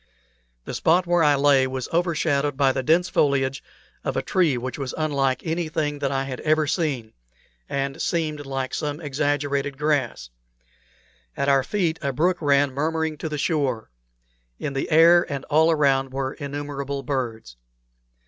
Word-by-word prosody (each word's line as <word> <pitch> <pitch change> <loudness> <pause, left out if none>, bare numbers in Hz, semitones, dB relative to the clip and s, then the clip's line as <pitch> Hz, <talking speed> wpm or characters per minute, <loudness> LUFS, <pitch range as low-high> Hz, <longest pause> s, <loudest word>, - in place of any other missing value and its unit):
The - - -6
spot 175 +3 +2
where 175 0 +2
I 145 -1 +5
lay 140 -2 +4
was 130 -1 -4
over 170 0 +1
shadowed 145 -3 0
by 135 -2 +4
the 130 - -2
dense 165 +7 +3
foliage 135 -3 +1 0.4
of - - -2
a - - 0
tree 165 -9 +2
which 125 +2 -5
was 135 -2 -4
unlike 140 -4 0
anything 155 -3 -2
that 140 -1 -1
I 135 0 0
had 130 -2 -6
ever 155 0 +2
seen, 140 -9 -2 0.6
and 140 0 -2
seemed 155 -3 -1
like 135 -1 -3
some 150 0 -3
exaggerated 145 -2 -1
grass; 140 - -1 1.1
at 140 - +1
our 135 -1 +4
feet 165 -1 -1
a 140 - -1
brook 175 +7 +1
ran 140 -2 +3
murmuring 160 +2 -1
to 160 - -4
the 150 - -3
shore; 140 - -1 0.7
in 140 - -4
the 135 - -2
air 170 +1 +5
and 140 -1 -4
all 160 +2 +5
around 135 -4 +2
were 135 0 -3
innumerable 140 -1 -5
birds. 120 - -4
145 Hz, 160 wpm, -23 LUFS, 135-155 Hz, 1.1 s, I